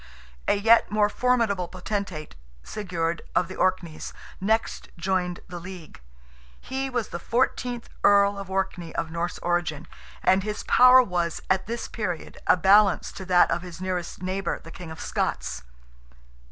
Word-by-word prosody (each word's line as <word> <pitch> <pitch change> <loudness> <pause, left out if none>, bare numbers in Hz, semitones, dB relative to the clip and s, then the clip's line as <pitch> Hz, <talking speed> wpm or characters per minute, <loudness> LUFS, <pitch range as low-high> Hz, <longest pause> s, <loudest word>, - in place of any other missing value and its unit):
A - - +4
yet 225 +3 +5
more 210 -1 +3
formidable 225 -7 +1
potentate, 185 -4 -4 0.3
Sigurd, 170 -5 -3
of 180 - +3
the 185 - -8
Orkneys, 175 -4 -1 0.3
next 220 +4 0
joined 180 0 -1
the 180 -1 -7
league. 175 - -10 0.6
He 270 0 -3
was 245 -4 -2
the 175 - -5
fourteenth 245 +2 -1 0.2
Earl 200 0 +5
of 195 -1 -7
Orkney 190 -3 -3
of 160 - -2
Norse 170 +2 -3
origin, 175 -3 -1 0.4
and 190 +1 +4
his 210 +1 -4
power 255 +1 +7
was, 175 -5 -1
at 190 0 +1
this 235 +1 -4
period, 185 -7 -4
a - - +6
balance 195 +2 +4
to 190 - -8
that 180 -1 +4
of - - 0
his 175 -2 -9
nearest 185 -1 -4
neighbour, 185 0 -2
the 165 - -13
King 175 -1 -9
of 160 - -9
Scots. - - -2
185 Hz, 155 wpm, -25 LUFS, 175-210 Hz, 0.6 s, power